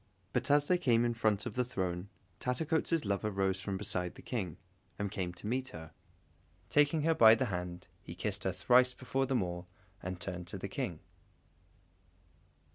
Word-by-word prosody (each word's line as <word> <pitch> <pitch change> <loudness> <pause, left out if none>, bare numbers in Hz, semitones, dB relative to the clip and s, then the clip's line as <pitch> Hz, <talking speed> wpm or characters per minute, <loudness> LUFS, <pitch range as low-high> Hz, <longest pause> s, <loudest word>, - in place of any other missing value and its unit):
But 125 +2 0
as 145 0 +5
they 180 +3 +3
came 120 -8 +3
in 120 - +1
front 110 -2 +1
of 120 - -4
the 125 - +1
throne, 95 -6 -3 0.3
Tattercoats' 160 +3 0
lover 100 +1 0
rose 95 -1 0
from 95 0 -2
beside 95 -3 -2
the - - -12
King, 95 - -3 0.4
and 100 -1 -2
came 95 -4 -2
to 90 - -12
meet 130 +4 -1
her. 80 -9 -9 0.8
Taking 145 +1 +3
her 165 +1 +4
by 110 -6 +8
the 130 - 0
hand, 90 0 -4
he - - -9
kissed 105 -1 -2
her 95 - +1
thrice 125 +7 +4
before 135 +1 -1
them 125 -6 +2
all, 90 0 -5 0.3
and 90 0 -5
turned 90 -2 -5
to 95 - -4
the 95 - -4
King. 100 - -4
105 Hz, 180 wpm, -33 LUFS, 90-125 Hz, 0.8 s, by